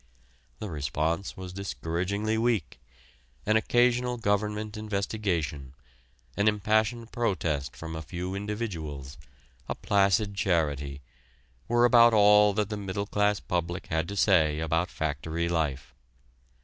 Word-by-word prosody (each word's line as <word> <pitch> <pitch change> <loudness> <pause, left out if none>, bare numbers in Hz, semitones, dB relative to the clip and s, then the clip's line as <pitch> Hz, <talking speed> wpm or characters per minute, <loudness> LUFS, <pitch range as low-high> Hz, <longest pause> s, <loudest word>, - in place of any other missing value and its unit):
The 105 +3 -6
response 80 +5 -2
was 90 -1 -7
discouragingly 100 +3 -2
weak 115 -1 0 0.7
an 110 - +2
occasional 120 +2 +2
government 105 0 -1
investigation, 95 -10 -2 0.6
an 100 +1 +1
impassioned 110 +2 +1
protest 80 - -1
from 80 0 -7
a 80 - -4
few 90 +4 -5
individuals, 85 - -5 0.5
a - - -1
placid 100 +1 +2
charity, 75 -8 -1 0.7
were 120 0 +4
about 120 -2 +6
all 105 0 +6
that 105 0 -1
the 105 - -3
middle 100 0 -3
class 105 0 +1
public 85 +1 -3
had 80 +1 0
to 100 - -5
say 80 -7 +3
about 80 +2 0
factory 80 +2 -2
life. 75 -7 -2
100 Hz, 120 wpm, -28 LUFS, 80-105 Hz, 0.7 s, about